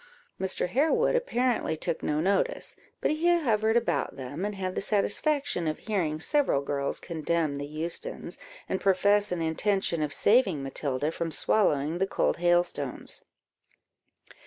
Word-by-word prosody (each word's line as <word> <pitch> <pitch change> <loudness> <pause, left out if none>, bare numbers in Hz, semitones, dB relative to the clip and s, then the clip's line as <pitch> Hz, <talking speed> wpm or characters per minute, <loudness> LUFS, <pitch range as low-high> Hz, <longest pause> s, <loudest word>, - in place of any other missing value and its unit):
Mr. 190 -1 0
Harewood 320 - +2
apparently 250 - 0
took 160 - -1
no 150 - 0
notice, 190 +4 0 0.3
but - - +1
he 345 +3 +3
hovered 225 -6 +2
about 235 - -1
them, 140 +6 -6
and 210 0 -2
had 185 -1 -3
the - - -2
satisfaction 210 - 0
of 155 - -1
hearing 170 -8 -2
several 270 - +1
girls 140 0 -2
condemn 160 -2 -1
the 145 0 -5
Eustons, 165 - -4 0.3
and 190 - -2
profess 200 +1 +3
an 175 -2 -1
intention 170 +1 0
of 150 -1 -1
saving 200 - +3
Matilda 135 +2 -2
from 165 0 -3
swallowing 155 -3 +2
the 195 - +1
cold - - 0
hailstones. 175 -6 0
180 Hz, 140 wpm, -28 LUFS, 155-215 Hz, 0.3 s, he